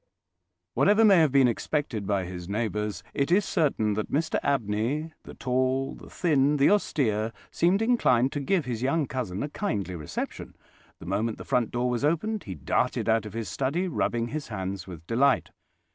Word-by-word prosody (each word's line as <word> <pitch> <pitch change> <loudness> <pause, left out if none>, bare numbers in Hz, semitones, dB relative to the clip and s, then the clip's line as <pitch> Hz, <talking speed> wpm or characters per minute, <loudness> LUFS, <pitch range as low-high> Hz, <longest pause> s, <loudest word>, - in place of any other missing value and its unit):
Whatever 210 +3 +4
may 200 -3 +7
have 155 -4 +4
been 135 -1 +5
expected 120 -3 -2
by 100 -3 0
his 90 0 -7
neighbours, 105 -1 -2
it 140 +4 0
is 195 +2 +4
certain 135 - +1
that 105 +1 -3
Mr 155 +3 0
Abney—the 135 +5 -2
tall, 130 +1 0
the - - -12
thin, 150 -4 +2
the 140 - +4
austere—seemed 150 - 0
inclined 135 - +3
to 145 - -3
give 170 +3 0
his 120 -3 -3
young 140 +4 +1
cousin 120 -8 -3
a 145 - -3
kindly 100 - -3
reception. 75 -3 -6 0.4
The - - -12
moment 110 +5 -1
the - - -9
front 120 -3 +1
door 120 +1 -1
was 125 +1 -1
opened 180 +8 0
he 95 - -6
darted 70 - -1
out 110 -1 +2
of 105 - -10
his 115 -1 -4
study, 150 +8 -1
rubbing 120 -8 -1
his 150 0 -4
hands 95 -3 -5
with 85 -3 -10
delight. 130 +6 +2
125 Hz, 175 wpm, -27 LUFS, 105-150 Hz, 0.4 s, may